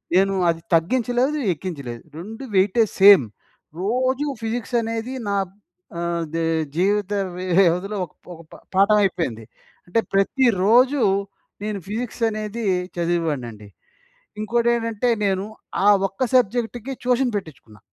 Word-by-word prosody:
నేను 195 +1 +4 0.2
అది 165 0 -1
తగ్గించలేదు, 245 - +1 0.2
ఎక్కించలేదు. 140 -9 -7
2 220 +9 -8
వెయిటేజ్ 205 +3 +3
సేమ్. 195 -9 +9 0.6
రోజు 255 +6 0 0.2
ఫిజిక్స్ 230 +2 -3
అనేది 225 +2 -4 0.2
నా 200 - 0
బ్ - - -27 0.5
ఆహ్, 170 -1 -1
దే 165 - -1 0.3
జీవిత 200 +3 +1 0.3
వ్యవధిలో 185 +2 +2
ఒక 160 - -23 0.2
ఒక 165 - -12
ప - - -11 0.2
పాఠం 200 +2 +5
అయిపోయింది. 160 - -1 0.4
అంటే 175 +6 +1
ప్రతిరోజు, 240 +5 +3 0.6
నేను 210 -1 -3
ఫిజిక్స్ 235 +3 -5
అనేది 215 +1 -4 0.3
చదివేవాడినండి. 150 -11 -2 0.7
ఇంకోటేంటంటే, 235 0 0 0.2
నేను 195 -1 0 0.4
ఆ - - +4 0.2
ఒక్క 240 +7 -2
సబ్జెక్ట్‌కి 245 +2 0
ట్యూషన్ 250 0 +2
పెట్టించుకున్న. 140 - -8
205 Hz, 115 wpm, -22 LUFS, 175-235 Hz, 0.7 s, సేమ్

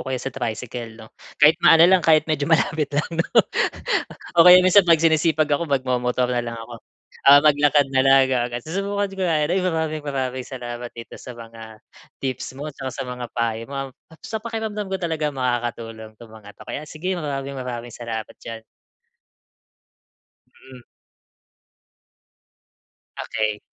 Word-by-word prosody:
kaya 130 - -1
sa 135 +2 -5
tricycle, 115 -2 -5
'no, 110 0 -14 0.2
kahit 150 +2 +5
maano 165 +1 +7
lang, 185 +1 +5
kahit 155 -2 +4
medyo 155 -1 -2
malapit 160 -2 +1
lang, 145 +1 -1
no? 165 +1 -1 1.1
O - - +8
kaya 180 0 +8
minsan 185 +2 +7
pag 165 - +7
sinisipag 160 -1 +2
ako, 160 +2 0
magmomotor 125 -2 0
na 120 - 0
lang 120 -1 -6
ako. 115 0 -10 0.5
Ah, 145 0 +9
maglakad 145 -2 +3
na 130 - +3
lang 135 -1 +5
gumaga 120 -1 -1
susubukan 200 +4 -2
ko 190 - -4
nga 155 -3 +1
rin. 185 - +2
Maraming, 160 -3 -2
maraming 130 -2 -3
salamat 120 -2 -7
dito 115 -1 -10
sa 125 - -9
mga 115 -1 -12 0.4
tips 130 -1 -4
mo 150 +2 -6
tsaka 135 -1 -6
sa 135 - -4
mga 125 -1 -6
payo 115 -1 -2
mom 135 -1 -5 0.2
at 160 - -16
sa 220 - -4
pakiramdam 220 -2 -4
ko 190 - -2
talaga 160 -3 -1
makakatulong 115 -3 -4
'tong 115 -2 -14
mga 105 -2 -13
'to. - - -13
Kaya 145 - -5
sige, 180 +6 -4
maraming, 140 -3 -4
maraming 120 -2 -6
salamat 115 -2 -6
diyan. 115 -1 -8 2.1
Mm. 125 -1 -13 2.4
Okey. 110 -1 -2
135 Hz, 155 wpm, -22 LUFS, 120-160 Hz, 2.4 s, Ah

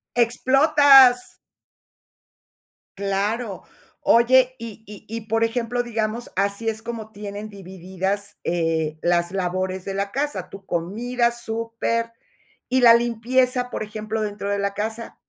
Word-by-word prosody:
¡Explotas! 260 +1 +5 1.6
Claro. 200 +2 -2 0.4
Oye, 255 +2 +4
y 225 -1 -9
y 210 0 -12
y, 225 0 -5
por 225 +1 +2
ejemplo, 240 +1 -1
digamos, 230 0 -3
así 200 +3 0
es 220 0 -2
como 220 -2 -7
tienen 205 +1 -7
divididas, 190 +1 -4
eh, 160 -2 -1
las 175 0 +1
labores 185 0 -2
de 195 - -4
la 200 0 -2
casa. 270 -10 -3
Tú, 195 -1 -12
comida, 235 +9 -1
súper. 230 0 -3 0.6
¿Y 260 0 +2
la 230 -1 +8
limpieza, 245 +2 +1
por - - -4
ejemplo, 215 +1 -4
dentro 205 -1 -4
de 200 - 0
la 200 0 -2
casa? 220 +3 -4
220 Hz, 125 wpm, -22 LUFS, 200-235 Hz, 1.6 s, la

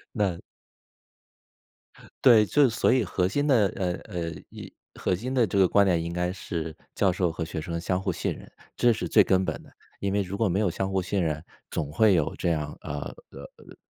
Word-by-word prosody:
那 100 -6 0 1.8
对， 115 -5 +7
就 140 +5 +4
所 110 - +2
以 130 -2 +3
核 90 -1 0
心 145 +9 0
的 120 -8 +4
呃， 90 -2 -1
呃， 85 -5 -4 0.2
一 - - -10 0.2
核 90 - -1
心 125 +8 -4
的 125 -4 +3
这 100 - -2
个 95 -1 +6
观 100 +3 +4
点， 90 -3 +2
应 85 0 -4
该 90 0 -1
是 80 -4 -5 0.2
教 95 - +2
授 90 -1 0
和 80 - -4
学 80 0 -5
生 85 +2 -4
相 90 +1 0
互 95 - -1
信 - - -2
任， - - -13 0.3
这 120 -1 +4
是 110 - -4
最 - - +6
根 95 -1 +2
本 - - -3
的。 - - -18 0.3
因 100 -1 -1
为 100 - +2
如 95 +1 -5
果 110 - +2
没 95 +1 0
有 105 -3 +2
相 95 +3 -2
互 95 -1 +1
信 95 +2 -1
任， 75 -2 -2 0.3
总 75 -2 -3
会 105 +6 +4
有 80 -5 +1
这 - - -1
样 75 -2 -3
呃， 75 - -5 0.3
呃， - - -11 0.2
呃， - - -15
95 Hz, 235 characters per minute, -26 LUFS, 85-105 Hz, 1.8 s, 对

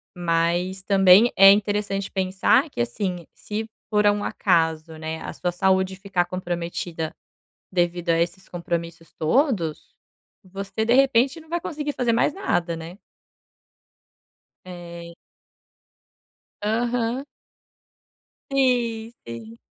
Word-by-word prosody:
Mas 175 +2 0
também 195 +3 +6
é 195 0 +9
interessante 205 -1 0
pensar 190 - +2
que, - - -10
assim, 175 - -2
se 220 +1 -5 0.2
por 210 -1 +2
um 205 0 +3
acaso, 160 -3 0
né, 160 0 -5
a - - -5
sua 180 - -2
saúde 190 +1 +1
ficar 190 -2 -1
comprometida 175 -2 -4 0.6
devido 175 -1 0
a 165 - +3
esses 175 +2 -3
compromissos 170 -1 -5
todos, 170 - 0 0.5
você, 195 +3 -4
de 230 +2 +3
repente, 270 +3 +3
não 315 - -18
vai 345 +1 -2
conseguir 295 -2 -4
fazer 240 -3 0
mais 235 +5 +2
nada, 175 - -1
né? 165 +4 -9 1.7
É. 170 -1 -9 1.5
Aham. 235 +3 0 1.3
Sim, 240 -4 +1
sim. 115 -1 -9
190 Hz, 110 wpm, -23 LUFS, 170-225 Hz, 1.7 s, é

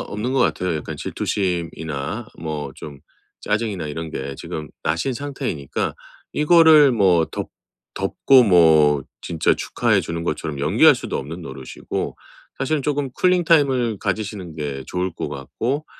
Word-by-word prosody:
없는 110 +5 -4
것 135 - +2
같아요. 90 -7 +1
약간 75 - -6
질투심이나 85 - -3
뭐 75 -4 -4
좀 70 -3 -10 0.4
짜증이나 105 -6 -2
이런 80 +2 -5
게 70 -2 -5
지금 75 -1 -6
나신 85 +12 0
상태이니까 130 - -3 0.4
이거를 155 -2 +6
뭐 90 -7 +4
덮 - - -6 0.4
덮고 130 -2 +4
뭐 80 - +5 0.2
진짜 80 -2 +1
축하해 - - +1
주는 85 0 -4
것처럼 75 -3 -3
연기할 - - +5
수도 - - -4
없는 80 +6 -6
노릇이고 65 -4 -5 0.4
사실은 150 +1 0
쪼금 145 -2 -1
쿨링 180 -1 +2
타임을 130 - +3
가지시는 100 -5 -4
게 70 -3 -4
좋을 90 0 -2
것 - - -4
같고 125 - -3
90 Hz, 300 characters per minute, -21 LUFS, 75-130 Hz, 0.4 s, 이거를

